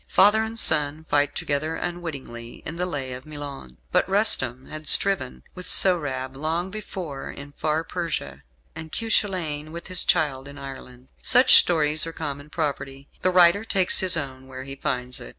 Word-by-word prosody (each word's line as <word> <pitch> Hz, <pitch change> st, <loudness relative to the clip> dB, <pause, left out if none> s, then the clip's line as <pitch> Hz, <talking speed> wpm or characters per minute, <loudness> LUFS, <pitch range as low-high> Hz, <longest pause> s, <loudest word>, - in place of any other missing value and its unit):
Father 210 Hz, +3 st, +4 dB
and 220 Hz, +1 st, -5 dB
son 150 Hz, -6 st, +6 dB
fight 145 Hz, 0 st, +1 dB
together 150 Hz, +3 st, -2 dB
unwittingly 140 Hz, -9 st, -7 dB
in 165 Hz, +2 st, -5 dB
"The 180 Hz, +1 st, -2 dB
Lay 135 Hz, -6 st, -5 dB
of 130 Hz, +3 st, -10 dB
Milon"; 145 Hz, -, -9 dB
but -, -, +1 dB
Rustum 130 Hz, -, +3 dB
had 155 Hz, 0 st, -9 dB
striven 140 Hz, -, +3 dB
with 180 Hz, -, -9 dB
Sohrab 135 Hz, -8 st, +2 dB
long 165 Hz, +6 st, -3 dB
before 185 Hz, -9 st, -7 dB
in 140 Hz, 0 st, -10 dB
far 155 Hz, +2 st, -2 dB
Persia, 160 Hz, -, -5 dB, 0.3 s
and 160 Hz, -1 st, -9 dB
Cuchulain 175 Hz, -9 st, -2 dB
with 170 Hz, +2 st, -9 dB
his 185 Hz, -1 st, +4 dB
child 145 Hz, -5 st, 0 dB
in 140 Hz, 0 st, -11 dB
Ireland. 130 Hz, -2 st, -11 dB
Such 255 Hz, +1 st, +4 dB
stories 155 Hz, -2 st, +4 dB
are 165 Hz, -, -7 dB
common 145 Hz, -2 st, -6 dB
property. 140 Hz, -3 st, -5 dB
The 185 Hz, -, +1 dB
writer 180 Hz, +2 st, +4 dB
takes 195 Hz, -5 st, +3 dB
his 185 Hz, -2 st, +3 dB
own 130 Hz, -3 st, -7 dB
where 130 Hz, 0 st, -9 dB
he 135 Hz, +1 st, -8 dB
finds 125 Hz, -2 st, -4 dB
it. -, -, -9 dB
150 Hz, 170 wpm, -23 LUFS, 135-175 Hz, 0.3 s, son